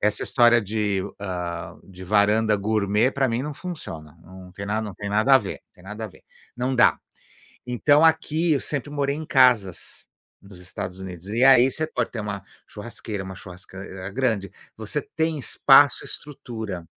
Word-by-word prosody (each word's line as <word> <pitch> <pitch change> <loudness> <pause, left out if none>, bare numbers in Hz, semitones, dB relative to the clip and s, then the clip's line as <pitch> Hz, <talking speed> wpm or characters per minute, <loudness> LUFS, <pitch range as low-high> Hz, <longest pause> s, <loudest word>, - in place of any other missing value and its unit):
Essa 105 0 +1
história 120 -1 +5
de, 105 -2 -1 0.2
hã, 90 -3 -5
de 95 -1 -13
varanda 105 +2 +3
gourmet 105 +3 +1
pra 135 -1 0
mim 115 +2 -1
não 150 +2 -4
funciona, 85 - -8
não 90 +1 -13
tem 100 +2 -7
na 105 +2 -1
não 105 -4 -6
tem 100 - -6
nada 110 +7 +4
a - - +8
ver, 100 -6 -6
tem 90 - -20
nada 105 +3 -7
a - - -3
ver, 100 - -17 0.3
não 125 +2 -1
dá. 120 - +4 0.7
Então, 145 +5 +3
aqui 160 +1 +2
eu 140 - +2
sempre 145 -1 -3
morei 140 -1 -1
em 155 0 -6
casas, 125 - +2 0.3
nos 100 -2 -14
Estados 90 +1 -7
Unidos, 90 0 -8
e 115 +4 -1
aí, 130 -1 +7
você 155 +4 -2
pode 125 -6 -2
ter 115 - -4
uma 105 -2 -5 0.3
churrasqueira, 105 -2 -6
uma 95 0 -7
churrasq 90 0 -11 0.4
grande, 110 -7 0 0.3
você 110 +7 -4
tem 160 +1 -2
espaço, 135 - +5
estrutura 110 - -7
110 Hz, 175 wpm, -24 LUFS, 95-130 Hz, 0.7 s, a